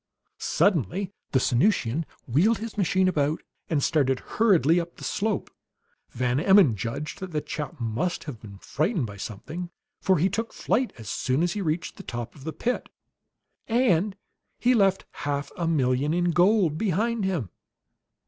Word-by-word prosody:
Suddenly 190 Hz, -, +1 dB, 0.2 s
the -, -, +3 dB
Sanusian 135 Hz, -, +2 dB, 0.2 s
wheeled 180 Hz, -, +3 dB
his 225 Hz, +1 st, -6 dB
machine 190 Hz, -2 st, +2 dB
about 155 Hz, -3 st, 0 dB, 0.3 s
and 150 Hz, -4 st, +1 dB
started 135 Hz, -5 st, +2 dB
hurriedly 175 Hz, -, +3 dB
up 170 Hz, 0 st, -5 dB
the -, -, -11 dB
slope. 210 Hz, -1 st, -1 dB, 0.6 s
Van 125 Hz, +1 st, 0 dB
Emmon 190 Hz, -, +6 dB
judged 115 Hz, +9 st, -4 dB
that 190 Hz, -1 st, -5 dB
the 155 Hz, -3 st, -1 dB
chap 150 Hz, 0 st, -5 dB, 0.5 s
had 135 Hz, -7 st, -7 dB
been 100 Hz, -3 st, -10 dB
frightened 155 Hz, -, -1 dB
by 100 Hz, -2 st, -8 dB
something, 155 Hz, -, -6 dB, 0.3 s
for 190 Hz, -, +3 dB
he 170 Hz, +5 st, +3 dB
took 225 Hz, +4 st, -3 dB
flight 255 Hz, +1 st, 0 dB
as 110 Hz, -3 st, -10 dB
soon 130 Hz, +8 st, 0 dB
as 175 Hz, 0 st, +1 dB
he 210 Hz, -, -3 dB
reached 165 Hz, -1 st, -2 dB
the -, -, -7 dB
top 120 Hz, -8 st, -5 dB
of 140 Hz, -2 st, -14 dB
the 160 Hz, -, -2 dB
pit. 245 Hz, +9 st, -2 dB, 0.8 s
And 215 Hz, -5 st, +2 dB, 0.4 s
he 250 Hz, +1 st, +3 dB
left 195 Hz, -4 st, +3 dB, 0.2 s
half 145 Hz, 0 st, -2 dB
a 170 Hz, -, -2 dB
million 140 Hz, 0 st, +1 dB
in 175 Hz, 0 st, +2 dB
gold 175 Hz, -3 st, +3 dB
behind 220 Hz, +3 st, 0 dB
him! 170 Hz, -, -1 dB
165 Hz, 160 wpm, -26 LUFS, 135-195 Hz, 0.8 s, Emmon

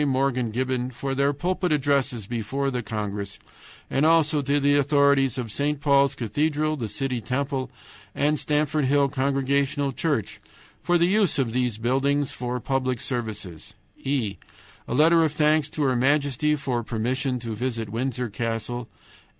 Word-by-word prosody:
Morgan 130 Hz, -3 st, +1 dB
Gibbon 125 Hz, +2 st, -1 dB
for 135 Hz, +2 st, -4 dB
their 140 Hz, +1 st, +2 dB
pulpit 175 Hz, +4 st, -1 dB
addresses 135 Hz, -6 st, +1 dB
before 125 Hz, +5 st, -2 dB
the 125 Hz, -1 st, -2 dB
congress, 105 Hz, -3 st, -4 dB, 0.5 s
and 135 Hz, -, 0 dB
also 155 Hz, -2 st, +4 dB
to 140 Hz, +1 st, +1 dB
the 145 Hz, 0 st, +3 dB
authorities 140 Hz, -2 st, +3 dB
of 120 Hz, -4 st, -4 dB
St. 145 Hz, +4 st, -1 dB
Paul's 140 Hz, -1 st, +3 dB
Cathedral, 150 Hz, +6 st, 0 dB
the 120 Hz, -6 st, -4 dB
City 125 Hz, +3 st, -3 dB
Temple, 130 Hz, +2 st, -2 dB, 0.5 s
and 150 Hz, +1 st, +1 dB
Stamford 150 Hz, 0 st, 0 dB
Hill 140 Hz, +1 st, +3 dB
Congregational 140 Hz, +1 st, 0 dB
Church 135 Hz, -5 st, -2 dB, 0.4 s
for 175 Hz, -, +2 dB
the 170 Hz, -, +3 dB
use 195 Hz, -2 st, +2 dB
of 125 Hz, -5 st, 0 dB
those 125 Hz, -3 st, 0 dB
buildings 135 Hz, +4 st, +1 dB
for 125 Hz, 0 st, -3 dB
public 130 Hz, 0 st, -1 dB
services. 105 Hz, -, -5 dB, 0.2 s
"e. 120 Hz, -8 st, -2 dB, 0.5 s
A -, -, -2 dB
letter 165 Hz, +3 st, +5 dB
of 155 Hz, -2 st, 0 dB
thanks 150 Hz, 0 st, +2 dB
to 150 Hz, -, -2 dB
her 130 Hz, -2 st, +2 dB
Majesty 145 Hz, +2 st, +2 dB
for 130 Hz, -4 st, -2 dB
permission 125 Hz, +3 st, -1 dB
to 115 Hz, -2 st, -5 dB
visit 115 Hz, -1 st, -3 dB
Windror 125 Hz, -1 st, -2 dB
Castle. 115 Hz, +1 st, -3 dB
135 Hz, 150 wpm, -25 LUFS, 120-145 Hz, 0.5 s, letter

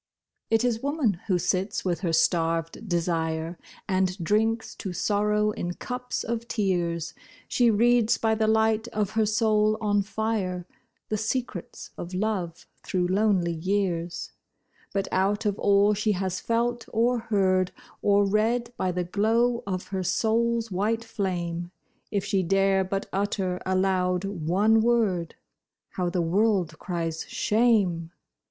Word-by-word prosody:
It 225 Hz, +1 st, +3 dB
is 235 Hz, -2 st, 0 dB
woman 275 Hz, -, 0 dB
who 185 Hz, -4 st, +2 dB
sits 190 Hz, +4 st, -1 dB
with 175 Hz, -2 st, 0 dB
her 175 Hz, -4 st, -1 dB
starved 165 Hz, +3 st, 0 dB
desire, 165 Hz, -1 st, -1 dB, 0.3 s
And 185 Hz, -1 st, +1 dB
drinks 220 Hz, +5 st, 0 dB
to 190 Hz, -4 st, -5 dB
sorrow 210 Hz, +3 st, +1 dB
in 175 Hz, -3 st, -4 dB
cups 250 Hz, 0 st, -4 dB
of 235 Hz, 0 st, -3 dB
tears; 170 Hz, -6 st, -1 dB, 0.3 s
She 245 Hz, -1 st, +3 dB
reads 230 Hz, +1 st, +3 dB
by 220 Hz, -1 st, +1 dB
the 220 Hz, 0 st, +1 dB
light 220 Hz, +1 st, +2 dB
of 210 Hz, -4 st, -2 dB
her 220 Hz, -1 st, +1 dB
soul 215 Hz, 0 st, +2 dB
on 205 Hz, -2 st, +2 dB
fire 200 Hz, -4 st, -2 dB, 0.4 s
The 215 Hz, -, -1 dB
secrets 220 Hz, -4 st, -4 dB
of 175 Hz, +2 st, -6 dB
love 185 Hz, -4 st, -2 dB, 0.2 s
through 180 Hz, -2 st, -1 dB
lonely 190 Hz, -3 st, +2 dB
years: 175 Hz, -1 st, -2 dB, 0.6 s
But 195 Hz, -1 st, -1 dB
out 200 Hz, +3 st, +1 dB
of 205 Hz, -1 st, 0 dB
all 200 Hz, +1 st, +4 dB
she 215 Hz, +1 st, +1 dB
has 185 Hz, -1 st, -2 dB
felt 235 Hz, +1 st, -1 dB
or 235 Hz, +2 st, +2 dB
heard 190 Hz, -5 st, +1 dB, 0.3 s
Or 200 Hz, 0 st, +4 dB
read 230 Hz, +4 st, +1 dB
by 185 Hz, -, 0 dB
the 180 Hz, 0 st, -1 dB
glow 225 Hz, +6 st, +1 dB
of 185 Hz, -2 st, -3 dB
her 190 Hz, -1 st, -2 dB
soul's 230 Hz, +3 st, +1 dB
white 215 Hz, +5 st, 0 dB
flame, 175 Hz, -6 st, -3 dB, 0.4 s
If 200 Hz, -3 st, -1 dB
she 195 Hz, -, +1 dB
dare 195 Hz, +1 st, +2 dB
but 195 Hz, +1 st, -3 dB
utter 190 Hz, -2 st, -1 dB
aloud 185 Hz, -1 st, +1 dB
one 200 Hz, +4 st, +2 dB
word— 215 Hz, -8 st, +1 dB, 0.5 s
How 180 Hz, -2 st, -2 dB
the 175 Hz, -1 st, 0 dB
world 185 Hz, -2 st, +1 dB
cries 165 Hz, -3 st, -3 dB
shame! 210 Hz, -7 st, +2 dB
200 Hz, 140 wpm, -26 LUFS, 180-220 Hz, 0.6 s, all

